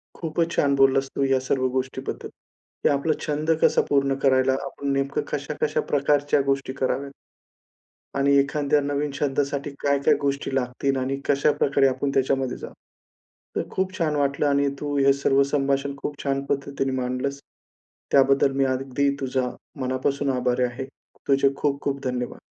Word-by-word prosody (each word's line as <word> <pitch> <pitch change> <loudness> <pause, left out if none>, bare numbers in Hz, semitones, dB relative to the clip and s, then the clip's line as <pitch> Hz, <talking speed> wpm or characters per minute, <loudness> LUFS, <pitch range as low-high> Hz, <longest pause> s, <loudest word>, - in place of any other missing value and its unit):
खूपच 165 0 -1
छान 140 -3 +2
बोललास 135 0 +3
तू, 140 - +1
ह्या 135 -1 +3
सर्व 130 -1 +1
गोष्टीबद्दल 130 +1 -3
की - - -6
आपला 145 +2 +1
छंद 150 +1 -2
कसा - - +5
पूर्ण 140 -1 +2
करायला 130 0 +4
आपण 140 0 -4
नेमकं 135 0 0
कशा-कशा - - -1
प्रकारच्या 145 0 +2
गोष्टी 135 -1 -2
कराव्यात. 135 +2 -1 1.1
आणि 140 0 +3
एखाद्या 145 +1 +1
नवीन 145 +1 -1
छंदासाठी 140 0 -1
काय-काय 140 -1 +3
गोष्टी 140 -1 -1
लागतील 135 +1 -1
आणि 130 +1 -1
कशाप्रकारे 140 -1 +3
आपण 135 +2 -1
त्याच्यामध्ये 135 -1 0
जाऊ. - - -9 0.8
तर - - +1
खूप 190 0 -2
छान 155 -3 0
वाटलं 140 0 +1
आणि 140 0 +2
तू 145 -1 -3
हे 140 0 +5
सर्व 140 0 +2
संभाषण 140 0 0
खूप 145 0 -6
छान 135 -1 -1
पद्धतीने 140 -1 -2
मांडलस. 125 +3 -2 0.7
त्याबद्दल 135 0 +4
मी 135 - +3
अगदी 135 +1 0
तुझ्या 130 -1 -1 0.3
मनापासून 130 +2 -1
आभारी 125 0 +1
आहे. 125 +2 -3 0.4
तुझे 140 0 +3
खूप 140 -1 -1
खूप 140 -1 -3
धन्यवाद. 125 -1 -3
140 Hz, 145 wpm, -24 LUFS, 135-140 Hz, 1.1 s, कसा